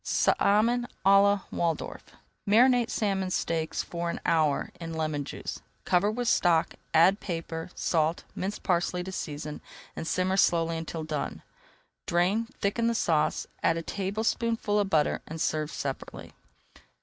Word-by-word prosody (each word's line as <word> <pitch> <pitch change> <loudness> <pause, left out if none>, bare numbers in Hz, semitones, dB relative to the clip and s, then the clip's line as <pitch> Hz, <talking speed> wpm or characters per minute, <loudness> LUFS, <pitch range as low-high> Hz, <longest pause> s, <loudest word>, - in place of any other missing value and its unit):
SALMON 235 +4 +2 0.2
À 195 0 +7
LA 200 0 +3
WALDORF 165 -2 -2 0.5
Marinate 245 +2 +5
salmon 195 -5 0
steaks 165 -3 -1
for 170 0 -4
an - - -3
hour 155 -4 +2
in 165 -1 -6
[Page - - -5
284] - - -4
lemon 155 -2 -1
juice. - - -6 0.2
Cover 185 +3 +3
with 240 +3 -2
stock, 170 -6 +3 0.2
add 185 +6 +5
pepper, 165 -2 -5
salt 160 0 0
and - - -20
minced 195 +3 -3
parsley 180 -1 0
to 190 - -6
season, 150 -4 -5 0.3
and 165 - -5
simmer 185 +2 +1
slowly 165 -3 +3
until 165 0 -5
done. 155 -2 -4 0.6
Drain, 185 +7 +2
thicken 230 +4 +1
the 235 - +1
sauce, 160 -8 +1 0.2
add 165 - +2
a 165 - -3
tablespoonful 210 +3 -1
of 200 -2 0
butter, 155 -5 +2
and 160 +1 -6
serve 155 -1 0
separately. 135 -1 -6
175 Hz, 150 wpm, -28 LUFS, 160-205 Hz, 0.6 s, À